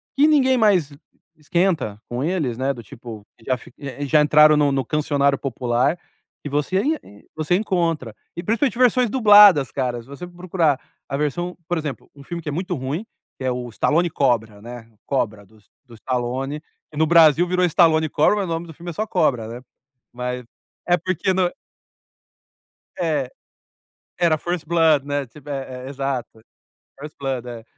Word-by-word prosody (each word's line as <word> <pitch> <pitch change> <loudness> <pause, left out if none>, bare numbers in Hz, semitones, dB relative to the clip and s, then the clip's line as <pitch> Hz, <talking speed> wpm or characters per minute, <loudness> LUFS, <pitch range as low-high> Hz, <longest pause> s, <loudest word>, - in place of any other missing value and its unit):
que 290 +3 +5
ninguém 265 -4 +4
mais 190 - +3 0.4
esquenta 155 - -1
com 120 +3 -3
eles, 155 -9 -1
né. 135 +1 0
Do 120 -2 -10
tipo, 115 -3 -10
que 115 - -21
já 130 -1 0
fi 125 - -15 0.4
já 150 +1 +4
entraram 150 0 +6
no 145 -1 +3
no 135 -1 -1
cancioneiro 140 -2 +1
popular 130 +4 0 0.4
e 145 - -5
você 150 +6 0
ai 265 - -3
você 155 +3 0
encontra. 165 - -1 0.2
E, 170 - -4
principalmente, 230 +4 0
versões 250 -1 +4
dubladas, 205 - +7
cara. 125 -3 -2
Se 115 - -19
você 140 +6 -8
for 175 - -17
procurar 170 -6 0 0.3
a 140 - -3
versão 175 +5 -2
por 175 - -1
exemplo, 150 -4 -5
um 140 - -13
filme 170 +2 -6
que 150 - -5
é - - -3
muito 180 +4 -3
ruim, 140 - -4 0.3
que 130 - -8
é 130 - +1
o 125 -1 -4
Stallone 165 +9 +1
Cobra, 115 -8 0
né, 120 0 -10 0.2
Cobra 110 -7 -2
do 110 +2 -23
S 105 - -27 0.2
do 120 - -16
Stallone, 130 +5 -3 0.3
que 150 - -11
no 160 - +3
Brasil 165 +1 +5
virou 180 0 +1
Stallone 160 -2 +3
Cobra. 155 +9 +3
Mas 200 - -1
o - - -7
nome 165 +1 -3
do 160 - -10
filme 175 +3 -9
é - - -5
só 215 - -2
Cobra, 135 - 0
né. 120 +2 -8 0.5
Mas 125 0 -4 0.4
é 175 0 +4
porque 185 +2 -1
no 185 -1 +1 1.5
É. 150 -7 0 0.9
Era 165 -3 +3
First 175 0 -3
Blood, 160 -4 +3
né, 145 -1 -2
tipo, 145 +4 -16
é 130 -2 -5
é, - - -6
exato. 135 -5 -4 0.6
First 150 +1 -9
Blood, 130 -3 -3
é. 115 -2 -8
150 Hz, 180 wpm, -22 LUFS, 125-175 Hz, 1.5 s, dubladas